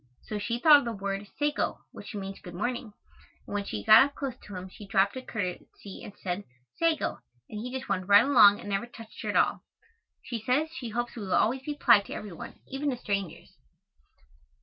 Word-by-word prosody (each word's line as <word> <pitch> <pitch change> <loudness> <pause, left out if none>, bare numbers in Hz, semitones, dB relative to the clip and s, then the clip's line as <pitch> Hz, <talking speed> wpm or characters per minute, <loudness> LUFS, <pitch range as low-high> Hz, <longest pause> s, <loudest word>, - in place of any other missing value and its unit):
So 210 - -4
she 205 +3 -2
thought 295 +4 +8
of 280 - -6
the 235 - -2
word 200 0 -4
sago, 295 0 -1
which - - -10
means 195 -1 -6
"good 175 -1 -10
morning," 235 +2 -3 0.5
and - - -8
when 205 -1 -1
she 105 - -5
got 220 +4 +9
up 280 +1 -4
close 275 -3 -3
to 205 - -11
him 185 +1 -6
she 200 +2 -12
dropped 195 +1 +2
a 260 - -4
curtesy 200 -3 -6
and 205 - -10
said 185 +2 -4 0.3
"Sago," 330 -2 0 0.3
and 210 - -7
he 245 +3 -5
just 260 0 -5
went 185 -1 -2
right 205 0 +7
along 220 -7 +7
and 205 - -8
never 200 +4 -1
touched 225 -2 -12
her - - -4
at - - -2
all. - - +3 0.6
She 235 -3 -5
says 280 +8 +1
she 250 -7 -6
hopes 240 +2 -3
we 230 - -6
will 190 -2 -1
always 255 +4 +2
be 295 +2 -4
polite 235 -8 +5
to - - -6
every 210 - -7
one, - - -9
even 275 +2 -2
to 255 - -2
strangers. 200 -6 -4
215 Hz, 220 wpm, -28 LUFS, 200-255 Hz, 0.6 s, got